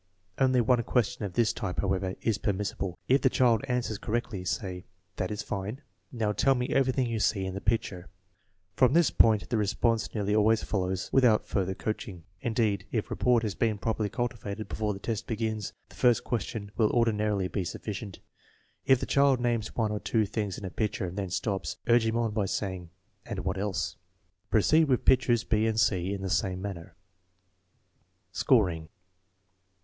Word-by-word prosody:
Only 130 -2 +4
one 120 +1 +3
question 120 -1 0
of 95 - -6
this 115 +2 +2
type, 90 - -4
however, 95 -1 -1
is 110 -3 0
permissible. 95 -3 -2
If 135 +2 +4
the 130 - +4
child 120 -2 +3
answers 125 -4 -1
correctly, 115 -4 -3
say: 90 -1 -3
" 90 +1 -45
That 90 - -1
is 105 - -4
fine; 105 +9 -5 0.3
now 110 -3 -1
tell 135 +5 +3
me 125 0 -2
everything 130 -1 +2
you 115 -2 -2
see 100 -2 +1
in 95 - -4
the 100 - -5
picture" 100 -5 -1 0.7
From 130 0 +4
this 170 -2 +4
point 110 -2 +4
the 120 - +1
responses 110 +3 0
nearly 105 -1 0
always 110 +1 +3
fol 95 -3 -1
low 95 - 0 0.2
without 125 -5 +4
further 95 -2 -1
coaxing. 100 -5 -5 0.2
Indeed, 110 -4 0
if 110 -3 -2
rapport 125 -2 +3
has 110 -3 -2
been 110 +3 0
properly 110 0 -1
cultivated 110 -3 -4
before 105 -1 -2
the - - -8
test 110 0 -3
begins, 110 -3 -2 0.2
the - - -16
first 120 -2 +3
ques 115 -4 -1
tion 100 -3 -6
will 110 -2 +4
ordinarily 105 -4 +1
be 95 0 -2
sufficient. 100 +2 -6 0.7
If 130 -2 +6
the - - -3
child 140 -2 +3
names 120 -3 -1
one 110 -3 0
or 105 - -2
two 110 0 +1
things 105 -1 -3
in 100 - -7
a 95 - -5
picture 105 -3 -2
and 90 0 -6
then 100 -2 -3
stops, 95 +2 -2
urge 120 -1 +4
him 110 +1 0
on 115 -2 0
by 105 -1 0
say 95 0 -2
ing, 90 -2 -9 0.3
"And - - -5
what - - -1
else?" 100 -1 -2 0.5
Proceed 155 +9 +4
with 130 -4 +1
pictures 120 -3 +4
b 110 0 +1
and 110 0 0
c 95 -3 +2
in 100 -1 -4
the 95 - -2
same 95 -3 0
manner. 95 -3 -7 1.4
Scoring. 85 -10 +2
110 Hz, 185 wpm, -28 LUFS, 100-120 Hz, 1.4 s, If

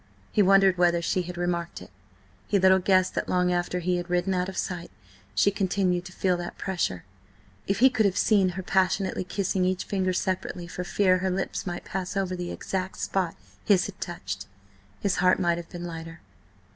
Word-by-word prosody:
He 210 - +3
wondered 195 -2 +5
whether 175 -1 +4
she 175 +2 0
had 175 0 -7
remarked 175 -1 -2
it. 90 - -13 0.6
He 205 - +2
little 190 0 +5
guessed 185 0 +3
that - - -2
long 180 0 +2
after 175 0 -1
he 180 +1 +1
had 175 0 -5
ridden 180 +2 +1
out 180 0 0
of 190 - -8
sight, 175 -2 -3 0.5
she 200 - +4
continued 185 -2 0
to 185 - -9
feel 185 0 +1
that 175 0 -6
pressure. 175 - -2 0.6
If 195 - +1
he 265 - +7
could 220 -4 +3
have 190 0 -2
seen 200 -3 +4
her 190 - -3
passionately 190 0 +1
kissing 190 +1 -1
each 185 0 0
finger 190 -2 0
separately 185 -1 -2
for 180 +1 -5
fear 185 0 +2
her 190 +1 0
lips 190 +1 -3
might 175 0 -4
pass 190 +1 -4
over 185 -2 -1
the 175 -1 -4
exact 190 0 -4
spot 185 -4 -1 0.3
his 190 -3 +4
had 200 - -8
touched, 100 - -5 0.5
his 195 -3 0
heart 185 +1 +4
might 170 -2 +2
have 170 - -9
been 175 -1 -7
lighter. 165 -1 -8
185 Hz, 195 wpm, -26 LUFS, 175-190 Hz, 0.6 s, he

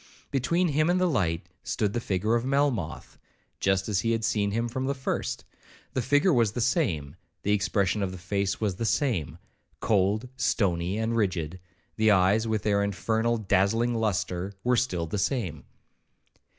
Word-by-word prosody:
Between 170 +7 +1
him 155 +3 +2
and 180 +1 +3
the 185 - +3
light 85 - 0 0.2
stood 105 -3 -1
the 120 - 0
figure 105 0 0
of 120 0 +2
Melmoth, 125 - -1 0.4
just 95 -1 +1
as 105 -3 +1
he 115 +3 +1
had 115 -1 -1
seen 105 -2 +1
him 115 +3 -1
from 130 +2 -3
the 140 - 0
first; 130 - -3 0.5
the 130 - 0
figure 145 - +3
was 115 -5 +2
the 120 - -3
same; 110 - 0 0.3
the 105 - +1
expression 100 0 +1
of 95 -2 -1
the 95 - -7
face 95 +2 -2
was 100 -4 -1
the 115 - -2
same,—cold, 100 - -1
stony, 95 -6 0
and 110 +1 -1
rigid; 90 -5 -1 0.4
the 110 0 +4
eyes, 100 +3 +4
with 110 -2 -1
their 100 -1 +2
infernal 110 +4 0
and 110 -3 -7
dazzling 110 +5 +2
lustre, 95 -3 -1
were 125 0 +3
still 95 -9 0
the 90 +6 -3
same. 95 - -2
105 Hz, 170 wpm, -27 LUFS, 95-120 Hz, 0.5 s, the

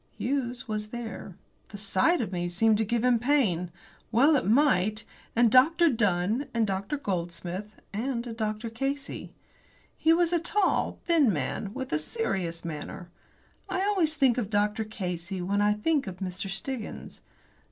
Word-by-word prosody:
Hughes 250 -1 -2
was 215 -1 -3
there 225 -5 -7 0.3
the 205 - -8
sight 210 - +2
of 215 - -3
me 175 -1 -2
seemed 215 +4 +3
to - - +3
give 230 +2 0
him 250 -2 +4
pain 220 - +1 0.4
well 275 +7 +5
it 260 - +1
might! 215 -4 +3 0.3
and 235 -1 +4
Dr. 325 +7 +6
Dunn, 215 +2 +1
and 230 -1 +3
Dr. 200 +7 -2
Goldsmith, 185 -1 -4
and 235 +3 -2
a 235 - -5
Dr. 220 0 -3
Casey. 275 +4 -4 0.6
He 320 - +3
was 340 +1 +3
a 345 - +3
tall, 370 +3 +1
thin 315 -9 +4
man, 165 +5 -2
with 260 - -4
a 150 - +2
serious 175 - -3
manner. 170 +2 -6 0.6
I 375 0 0
always 370 -6 +2
think 260 -4 +3
of 210 -5 -3
Dr. 210 +1 +1
Casey 180 -3 -4
when 200 +3 0
I 210 0 +4
think 275 +5 0
of 185 -2 -6
Mr. 190 0 -4
Stiggins. 220 +5 -5
220 Hz, 160 wpm, -28 LUFS, 190-270 Hz, 0.6 s, Dr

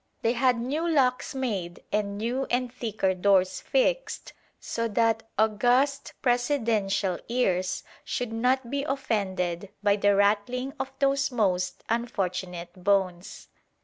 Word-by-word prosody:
They 230 - +3
had 250 -1 +2
new 295 +8 -1
locks 265 -3 +1
made 200 -10 -3
and 200 -1 -1
new 245 +5 -1
and 245 0 0
thicker 215 -6 -1
doors 185 0 +2
fixed - - 0 0.3
so 230 0 -2
that 225 0 +1
august 245 +6 +2
presidential 225 -7 +1
ears 185 -7 0 0.2
should 245 -5 -3
not 250 +2 +1
be 280 0 -1
offended 200 -9 -2
by 205 0 +4
the 205 0 +3
rattling 215 +7 +1
of 265 0 -3
those 275 0 +2
most 185 -6 0
unfortunate 185 -6 -3
bones. 190 -3 0
225 Hz, 120 wpm, -27 LUFS, 195-255 Hz, 0.3 s, by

